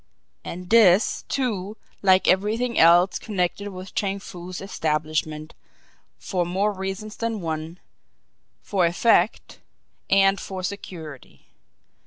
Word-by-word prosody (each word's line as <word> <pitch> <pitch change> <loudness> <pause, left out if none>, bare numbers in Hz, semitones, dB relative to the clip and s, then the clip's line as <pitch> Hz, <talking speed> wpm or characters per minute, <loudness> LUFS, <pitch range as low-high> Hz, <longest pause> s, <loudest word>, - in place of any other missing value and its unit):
And 180 +2 -8
this, 215 -4 +5
too, 215 -6 -2 0.2
like 190 -1 +4
everything 220 +5 +1
else 175 +3 +5
connected 200 0 -2
with 185 -1 -9
Chang 200 -1 -1
Foo's 180 -2 -8
establishment, 155 -3 -2 0.6
for 180 -3 -2
more 190 +4 0
reasons 195 +2 -5
than 230 -2 -3
one 160 0 -5 0.8
for 185 -4 +1
effect 175 +7 +1 0.5
and 195 0 +4
for 190 -1 -6
security. 170 -7 -8
190 Hz, 105 wpm, -24 LUFS, 175-205 Hz, 0.8 s, this